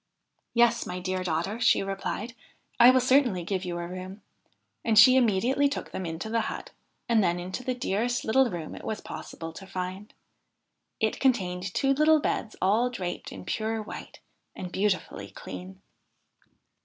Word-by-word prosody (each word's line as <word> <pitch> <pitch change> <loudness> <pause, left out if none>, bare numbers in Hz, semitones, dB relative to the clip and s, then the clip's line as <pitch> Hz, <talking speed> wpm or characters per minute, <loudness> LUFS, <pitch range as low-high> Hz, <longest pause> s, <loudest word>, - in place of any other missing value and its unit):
' - - -49
Yes, 235 0 +3
my 180 - -4
dear 185 0 -2
daughter,' 180 +6 -1
she 235 - +4
replied, 195 +4 -4 0.2
' - - -37
I 240 +1 +10
will 255 0 +6
certainly 255 -7 +3
give 190 +1 -2
you 175 -1 -3
a 170 - -4
room.' 185 +3 -8 0.6
And 225 -2 +2
she 255 +5 +9
immediately 255 +4 +3
took 285 - -5
them 185 - -4
into 165 +6 -5
the 230 +1 +1
hut, - - -7 0.4
and 225 -3 +4
then 175 -1 +1
into 185 +7 -5
the 255 0 -1
dearest 245 +2 -1
little 260 +3 +4
room 170 -5 -5
it - - -9
was 220 - -3
possible 165 -1 -8
to 195 +3 -10
find. 185 +3 -5 0.9
It - - 0
contained 190 -8 +1
two 275 0 +3
little 305 +2 +5
beds 225 -6 -2
all 220 +6 +3
draped 185 -8 -5
in 95 -1 -9
pure 220 0 -1
white 215 - -8 0.4
and 180 - -6
beautifully 195 0 -1
clean. 95 +1 -9
205 Hz, 170 wpm, -27 LUFS, 180-240 Hz, 0.9 s, I